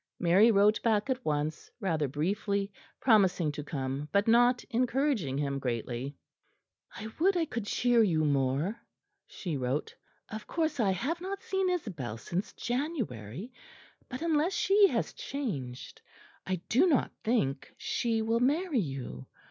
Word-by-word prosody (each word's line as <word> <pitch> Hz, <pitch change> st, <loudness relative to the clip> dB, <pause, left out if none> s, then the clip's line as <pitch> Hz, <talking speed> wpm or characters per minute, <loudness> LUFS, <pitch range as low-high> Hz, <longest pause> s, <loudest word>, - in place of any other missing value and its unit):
Mary 185 Hz, +6 st, +5 dB
wrote 210 Hz, 0 st, +4 dB
back 220 Hz, +2 st, +1 dB
at 255 Hz, 0 st, -2 dB
once, 150 Hz, +1 st, -2 dB
rather 165 Hz, -8 st, 0 dB
briefly, 200 Hz, +7 st, -1 dB, 0.3 s
promising 190 Hz, -, +4 dB
to 145 Hz, 0 st, -6 dB
come; 140 Hz, 0 st, -4 dB
but 200 Hz, +4 st, +2 dB
not 245 Hz, +2 st, +4 dB
encouraging 245 Hz, -, +1 dB
him 140 Hz, -1 st, -1 dB
greatly. 125 Hz, +2 st, -3 dB, 0.8 s
"I 220 Hz, -, -6 dB
would 370 Hz, +3 st, +3 dB
I 335 Hz, -, +2 dB
could 235 Hz, -8 st, -5 dB
cheer 240 Hz, +1 st, +3 dB
you 165 Hz, -7 st, +2 dB
more," 140 Hz, -, 0 dB, 0.5 s
she 170 Hz, -7 st, -4 dB
wrote; 130 Hz, +3 st, -2 dB, 0.3 s
"of 215 Hz, -1 st, -7 dB
course 315 Hz, -4 st, -1 dB
I 210 Hz, -4 st, +3 dB
have 275 Hz, -, -1 dB
not 390 Hz, +2 st, -5 dB
seen 385 Hz, -1 st, 0 dB
Isabel 175 Hz, -, -3 dB
since 175 Hz, -, -3 dB
January; 235 Hz, -, -4 dB, 0.6 s
but, 255 Hz, +5 st, -5 dB
unless 325 Hz, +2 st, +2 dB
she 395 Hz, +3 st, +5 dB
has -, -, -1 dB
changed, 140 Hz, -, -5 dB, 0.5 s
I 190 Hz, -, +1 dB
do 290 Hz, +11 st, +4 dB
not 290 Hz, -8 st, +2 dB
think 140 Hz, -, 0 dB
she 225 Hz, -2 st, -1 dB
will 225 Hz, +1 st, +1 dB
marry 295 Hz, +3 st, +2 dB
you. 135 Hz, -, -5 dB
205 Hz, 140 wpm, -30 LUFS, -, 0.8 s, Mary